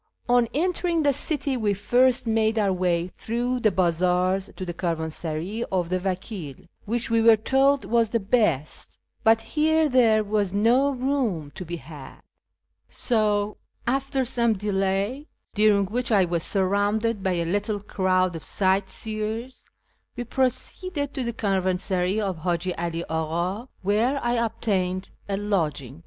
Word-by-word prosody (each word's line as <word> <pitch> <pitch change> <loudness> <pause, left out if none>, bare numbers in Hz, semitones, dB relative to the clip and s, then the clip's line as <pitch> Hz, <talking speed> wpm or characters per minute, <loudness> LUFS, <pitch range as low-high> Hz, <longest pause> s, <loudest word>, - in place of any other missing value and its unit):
On 245 -1 +4
entering 345 0 0
the 285 -1 +3
city 285 -1 -1
we 210 -4 0
first 250 +5 +3
made 220 0 +1
our 200 -3 +2
way 180 -1 0
through 245 +3 -1
the 220 - +3
bazaars 185 +1 +1
to 185 - -4
the 175 - -4
caravansaray 165 +4 -3
of 180 -3 0
the 185 0 0
Vakil, 185 - -4 0.3
which 230 +2 -1
we 230 0 +3
were 225 0 +7
told 270 +5 +2
was 230 -1 +2
the 230 - +1
best; 195 - 0 0.3
but 225 0 +5
here 315 +6 +2
there 230 -5 +4
was 205 -2 -1
no 240 +7 +4
room 250 - -1
to - - -7
be 175 0 -5
had, 150 -3 -11 0.7
so, 210 -3 0 0.3
after 270 +1 0
some 235 -2 +1
delay, 200 +6 -1 0.3
during 210 -2 +4
which 240 +5 -2
I 200 -4 +5
was 170 -1 -1
surrounded 205 +4 0
by 190 -1 0
a 170 -1 -1
little 205 +4 -1
crowd 185 -3 0
of 160 - -7
sight 190 0 +1
seers, 220 +3 -4 0.5
we 245 - -3
proceeded 280 - -2
to 265 - -2
the 235 - -2
caravansaray 190 -2 0
of 195 -5 -2
Haji 175 +2 -1
'All 170 0 -3 0.5
Aka, 250 +3 -12
where 225 +8 +1
I 240 0 +1
obtained 195 -5 -1 0.2
a 195 - 0
lodging. 155 - -2
210 Hz, 145 wpm, -25 LUFS, 185-240 Hz, 0.7 s, were